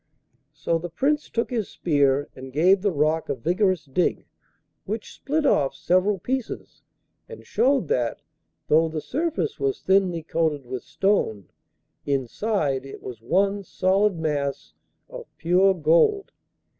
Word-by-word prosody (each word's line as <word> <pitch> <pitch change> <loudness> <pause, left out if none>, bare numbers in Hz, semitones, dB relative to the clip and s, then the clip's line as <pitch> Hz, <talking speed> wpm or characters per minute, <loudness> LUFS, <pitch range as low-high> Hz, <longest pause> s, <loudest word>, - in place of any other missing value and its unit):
So 165 +3 -1
the 175 +1 -6
Prince 290 - 0
took 230 +2 -2
his 225 -5 -2
spear 145 -3 +1
and 130 0 -9
gave 180 +7 +4
the 205 - +2
rock 155 +1 0
a - - 0
vigorous 180 - 0
dig, 140 +6 0 0.6
which 215 +2 -5
split 300 +2 -1
off 140 - +2
several 185 +3 +2
pieces, 255 +5 -5 0.5
and 465 - -11
showed 265 - +2
that, 120 -2 -1 0.4
though 160 +2 +4
the 160 0 -3
surface 260 - -2
was 135 -1 -1
thinly 185 -4 +2
coated 155 -4 -1
with 125 0 -5
stone, 140 - 0 0.5
inside 140 - -1
it 135 - -10
was 120 -3 -8
one 195 - +1
solid 190 +1 +1
mass 145 -3 -2 0.3
of - - -9
pure 185 +3 +3
gold. 170 - +3
170 Hz, 135 wpm, -24 LUFS, 145-205 Hz, 0.6 s, gave